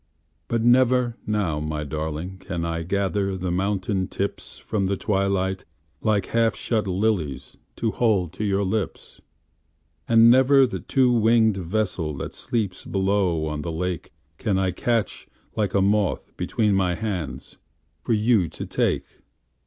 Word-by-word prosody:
But 115 -1 0
never 125 0 +4
now, 100 -8 0
my 75 0 -3
darlingCan 80 +4 -4
I 85 0 -2
gather 100 +2 -1
the 90 -1 -3
mountain 95 0 -1
tipsFrom 100 0 -3
the 100 0 -1
twilight 95 -1 0 0.4
like 105 -2 +1
half 115 -1 +1
shut 110 -3 -1
liliesTo 95 - -2
hold 100 -8 +1
to 105 - -4
your 100 -1 +1
lips. 100 +1 -3 0.9
And 115 0 +7
never 130 +2 +6
the 120 - -4
two 130 -2 +2
winged 110 -2 +4
vesselThat 90 -5 -2
sleeps 105 -6 -3
below 95 -4 0
on 75 -1 -3
the 85 - -4
lakeCan 90 +3 -4
I 95 -1 +1
catch 115 +4 -1 0.3
like 105 -3 -1
a 100 - +4
moth 100 -1 0
between 105 -3 0
my 95 -2 +1
handsFor 95 -7 -5 0.5
you 110 -5 +3
to - - -7
take. - - 0
100 Hz, 130 wpm, -24 LUFS, 90-110 Hz, 0.9 s, And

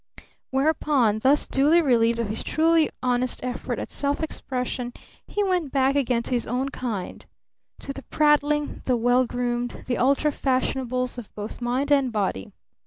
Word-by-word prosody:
Whereupon, 270 -5 +2
thus 275 +5 +3
duly 295 +5 +4
relieved 235 -6 +3
of 230 -2 -1
his 215 - -2
truly 325 0 +3
honest 250 0 0
effort 250 -1 -3
at - - -6
self 285 +2 -1
expression, 250 -4 -3 0.3
he 415 - -1
went 360 -7 0
back 270 0 +2
again 250 -4 +1
to - - -6
his 240 - 0
own 255 +4 -1
kind 230 -8 -5 0.6
to 275 - -5
the 275 - -8
prattling, 295 0 +1
the 250 -2 +2
well 245 +2 +3
groomed, 245 0 -3
the 245 - -1
ultra 280 +4 +3
fashionables 255 -2 -1
of 225 - -11
both 210 +3 -7
mind 255 +4 -1
and 275 -3 +3
body. 195 - -2
255 Hz, 160 wpm, -24 LUFS, 245-285 Hz, 0.6 s, duly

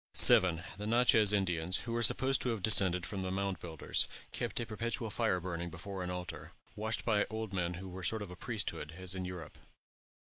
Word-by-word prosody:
7. 85 -2 +7 0.2
The 105 - -4
Natchez 115 -3 +5
Indians, 90 -3 0
who 115 -1 -4
are 120 - 0
supposed 130 +3 +2
to 125 - -1
have 110 -5 -3
descended 90 -4 +5
from 100 -2 -5
the 95 - -3
Mound 95 0 -2
Builders, 80 -3 -1 0.2
kept - - -3
a 120 - -2
perpetual 115 +1 -3
fire 110 -6 0
burning 85 -1 -5
before 95 +2 -7
an 90 - -4
altar, 90 -1 -7 0.2
watched 110 +1 -2
by 105 -3 +2
old 110 -2 -5
men 90 -2 -2
who 95 +2 -8
were 95 0 -8
a - - -5
sort 110 +1 -2
of 90 -3 -10
priesthood, 105 -8 -4
as 95 -1 -2
in 95 -1 -4
Europe. 90 -4 -8
95 Hz, 205 wpm, -33 LUFS, 90-110 Hz, 0.2 s, 7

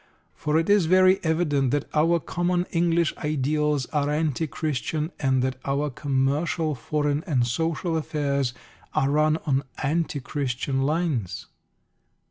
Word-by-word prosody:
For 150 +1 0
it 165 - +1
is 205 -5 +4
very 185 +2 +5
evident 155 -5 +1
that 145 +2 0
our 165 +3 +3
common 175 +2 -1
English 170 -1 +2
ideals 150 -1 0
are 145 -1 +1
anti 155 0 0
Christian, 155 +2 -2
and 130 -2 +2
that 130 0 -1
our 140 +1 -1
commercial, 145 +4 0
foreign 145 +4 -1
and 130 -9 +1
social 165 +5 -1
affairs 140 -4 -1 0.4
are 135 - +2
run 155 +1 +3
on 135 -3 +2 0.2
anti 155 +1 0
Christian 135 0 -2
lines. 140 - -1
150 Hz, 130 wpm, -25 LUFS, 135-165 Hz, 0.4 s, very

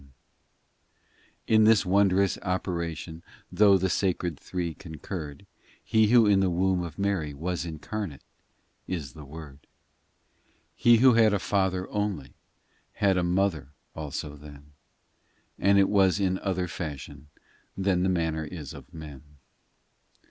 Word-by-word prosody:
in 110 - +3
In - - +6
this 110 -2 +5
wondrous 100 0 +2
operation, 85 -3 -3 0.3
Though 100 -2 +5
the 95 +1 0
Sacred 90 -3 -1
Three 85 -3 -4
concurred, 80 -1 -8 0.4
He 110 -1 +3
who 115 0 +6
in 100 -2 +4
the 95 -1 +2
womb 90 +1 +1
of 85 -3 -7
Mary 95 -8 -1
Was 85 +4 -3
incarnate, 80 - -6 0.6
is 75 -9 -4
the 75 - -11
Word. 70 -1 -11
IV - - -39 1.1
He 120 -1 +5
Who 130 +2 +6
had 110 -2 +4
a - - 0
Father 95 -2 0
only 105 -9 -3 0.6
Had 100 -2 +2
a 90 - +1
Mother 85 -5 0 0.2
also 75 -1 -5
then: 75 0 -14 0.9
But 100 +1 +4
it 100 -1 +5
was 95 -1 +3
in 95 -1 0
other 95 -2 -2
fashion 75 -4 -7 0.5
Than 95 -2 +1
the 95 - +1
manner 80 -3 -1
is 75 -3 -8
of - - -13
men. 75 -5 -10
90 Hz, 135 wpm, -27 LUFS, 80-100 Hz, 1.1 s, In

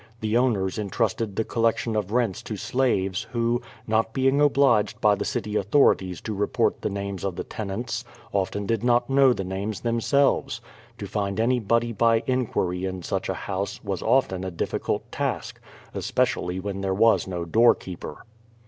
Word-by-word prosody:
The 110 0 -1
owners 110 -6 +1
entrusted 105 0 -1
the 110 - +1
collection 115 0 0
of 105 -2 -1
rents 115 -5 0
to 105 - -6
slaves, 100 -7 0
who, 120 +1 +1 0.2
not 110 0 +1
being 135 +2 +2
obliged 135 -7 +3
by 105 -1 +4
the 100 - -2
city 105 0 -3
authorities 100 - +2
to 110 - -4
report 105 0 0
the - - -1
names 100 -2 -4
of 95 -3 -2
the - - -4
ten 105 -3 -6
ants, 115 +3 -3 0.3
often 100 +1 -1
did 115 +1 -1
not 120 +1 +2
know 135 -1 +6
the 100 - -1
names 95 +2 -4
themselves. 115 0 +1 0.4
To 100 - -6
find 100 0 -2
any 125 +2 +2
body 115 +2 +1
by 115 +1 +3
inquiry 105 -8 -1
in 95 -1 -4
such - - -2
a - - -1
house, 100 0 -3
was 100 -4 -3
often 95 -8 +2
a 95 - -2
difficult 85 - -3
task, - - -3 0.3
es - - -4
pecially 90 +1 0
when 100 0 -4
there 95 -1 -1
was 115 +1 +4
no 90 -2 -3
doorkeeper. 95 -2 +1
105 Hz, 175 wpm, -25 LUFS, 95-120 Hz, 0.4 s, know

